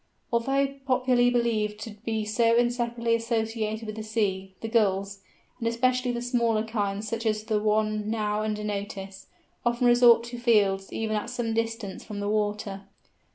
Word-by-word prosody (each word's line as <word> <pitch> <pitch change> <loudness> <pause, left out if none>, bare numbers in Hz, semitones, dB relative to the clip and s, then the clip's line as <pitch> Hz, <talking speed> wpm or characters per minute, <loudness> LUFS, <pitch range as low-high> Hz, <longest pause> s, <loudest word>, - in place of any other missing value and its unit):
Although 275 +4 +1
popularly 255 -1 +3
believed 220 -4 0
to 225 - -6
be 215 +1 -3
so 230 +2 +3
inseparably 240 -1 +1
associated 225 -1 -1
with 215 0 -6
the - - -3
sea, 195 -4 -2
the 225 - -3
Gulls, 200 -3 +1 0.4
and 230 - -1
especially 250 +2 +1
the 240 0 -3
smaller 235 -3 +1
kinds 210 -2 -2
such 230 +1 -3
as 215 -1 0
the 215 -1 0
one 215 0 +1
now 210 -1 0
under 215 -1 -2
notice, 200 -2 -5 0.4
often 240 +1 +1
resort 240 -1 +6
to 240 0 -7
fields 200 -5 +2
even 220 -1 -2
at 210 +3 -2
some 240 -2 -2
distance 225 -3 -3
from 210 -2 -7
the 205 - -2
water. 205 -2 -2
220 Hz, 160 wpm, -27 LUFS, 210-235 Hz, 0.4 s, resort